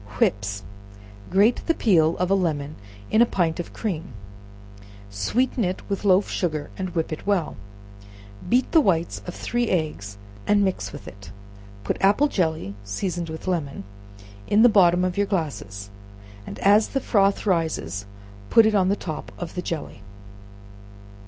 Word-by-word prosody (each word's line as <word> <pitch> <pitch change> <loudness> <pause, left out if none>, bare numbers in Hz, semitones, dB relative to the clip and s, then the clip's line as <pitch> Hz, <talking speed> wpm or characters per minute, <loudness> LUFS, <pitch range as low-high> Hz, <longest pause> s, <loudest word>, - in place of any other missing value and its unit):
Whips. 100 0 0 0.7
Grate 205 +6 +3
the 330 - +3
peel 165 -7 +3
of 180 +1 0
a - - +6
lemon 155 -6 -1 0.4
in 220 - +4
a - - +7
pint 170 -5 0
of 175 - -5
cream, 165 - -4 1.0
sweeten 235 - 0
it 185 0 -3
with 200 - -2
loaf 195 0 +4
sugar, 155 -5 -2
and 185 -2 -5
whip 160 -1 -1
it 155 - -8
well; 195 -5 0 0.9
beat 250 +2 +2
the 325 - +6
whites 170 - 0
of 180 - -6
three 240 -1 -1
eggs 150 - -2 0.3
and 205 -1 +4
mix 140 - -2
with - - -10
it; 100 0 -11 0.5
put - - -1
apple 205 +10 +4
jelly, 160 - -1
seasoned 170 - -3
with 160 0 -7
lemon, 155 - -2 0.6
in 210 +2 +4
the 245 - +8
bottom 180 -3 +4
of 185 0 -2
your 205 0 +2
glasses, 105 - -4 0.6
and - - -7
as 205 +2 +5
the 270 - -1
froth 200 -5 +2
rises 155 - -1 0.4
put 230 - +6
it 220 - +3
on 190 -3 +3
the 200 - +2
top 155 - -6
of 165 - -6
the 180 - -3
jelly. 165 -4 -5
180 Hz, 160 wpm, -24 LUFS, 155-200 Hz, 1.0 s, the